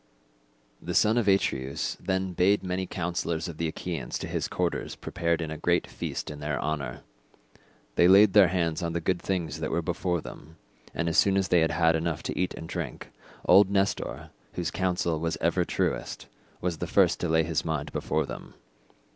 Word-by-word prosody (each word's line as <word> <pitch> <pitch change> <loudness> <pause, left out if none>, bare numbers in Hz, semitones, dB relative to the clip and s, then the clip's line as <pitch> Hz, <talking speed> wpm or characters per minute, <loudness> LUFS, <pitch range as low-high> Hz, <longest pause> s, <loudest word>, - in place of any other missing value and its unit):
The - - -4
son 110 +1 +4
of 110 - -1
Atreus 70 -9 0
then 95 -1 -1
bade 95 +4 +3
many 95 0 -2
councillors 85 -1 -2
of 85 -3 -7
the 85 - -1
Achaeans 80 -5 -4
to - - -5
his - - -2
quarters - - -2
and - - -16
prepared 85 -1 -1
a 80 -1 -4
great - - +2
feast - - -5
in 75 - -8
their 75 -1 -2
honour. 75 -2 -3 1.0
They 85 - +6
laid 100 +1 +7
their 100 -3 +8
hands 85 -3 -1
on 85 -1 -2
the 85 - 0
good 85 +1 -1
things 85 -5 -2
that 80 - -2
were 85 +1 -1
before 90 0 -1
them, 80 +1 -11 0.4
and 85 - -1
as 85 - +3
soon 100 -1 +4
as 95 -2 0
they 90 - +5
had 80 0 +3
enough 80 0 -2
to - - -3
eat 90 - -1
and 80 - -8
drink, - - -5 0.3
old 100 -1 +7
Nestor, 100 0 -1 0.2
whose 85 -2 -2
counsel 90 -3 0
was 80 0 -2
ever - - +2
truest, - - -2 0.4
was 85 -3 -2
the - - -3
first - - +3
to 90 - -2
lay 80 0 +3
his 80 -1 -1
mind 80 -3 -3
before - - -1
them. - - -9
85 Hz, 190 wpm, -27 LUFS, 80-95 Hz, 1.0 s, their